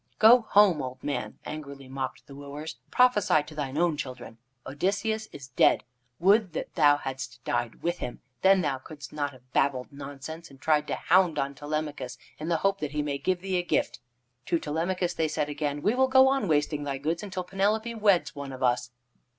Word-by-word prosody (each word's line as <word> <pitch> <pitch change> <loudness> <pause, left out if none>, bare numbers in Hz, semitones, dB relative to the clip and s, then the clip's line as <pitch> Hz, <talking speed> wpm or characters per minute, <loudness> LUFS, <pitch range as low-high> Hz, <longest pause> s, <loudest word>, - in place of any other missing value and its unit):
"Go 235 +3 +8
home, 195 -7 +5
old 130 -1 -7
man," 140 -4 -3
angrily 140 -3 -7
mocked 130 0 -5
the 140 - -12
wooers. 145 +3 -7
"Prophesy 210 -11 +4
to 155 - -12
thine 145 -2 -4
own 170 -2 +2
children. 125 -5 -7 0.3
Odysseus 205 +9 -1
is 135 -1 -10
dead. 125 - +4 0.3
Would 195 0 +3
that - - -5
thou 145 -2 +5
hadst 130 -3 -6
died 120 -1 -2
with 175 +1 -1
him. 120 - -5 0.2
Then 190 0 +5
thou 140 -5 -1
couldst 145 +1 -11
not 145 -1 -1
have 130 -1 -20
babbled 135 -2 +1
nonsense, 145 +4 -8
and 135 -1 -16
tried 150 0 +2
to - - -1
hound 175 -3 +3
on 140 0 -1
Telemachus 145 -3 -4 0.2
in 155 +2 -4
the 170 - +2
hope 195 0 +2
that 150 -1 -4
he 150 0 0
may 140 -1 -2
give 185 +2 0
thee 190 -1 -1
a - - +2
gift." 175 - -1 0.5
To 170 - +2
Telemachus 170 +4 -1
they 160 - 0
said 150 -1 -2
again: 145 -1 -3
"We 210 - +3
will 260 +1 +3
go 265 0 +6
on 270 -6 +1
wasting 150 -1 +1
thy 140 -1 -3
goods 160 +5 -2
until 190 -3 -4
Penelope 210 +5 0
weds 205 -5 +2
one 140 -1 -6
of 130 0 -6
us." 125 0 +1
150 Hz, 200 wpm, -27 LUFS, 140-185 Hz, 0.5 s, Go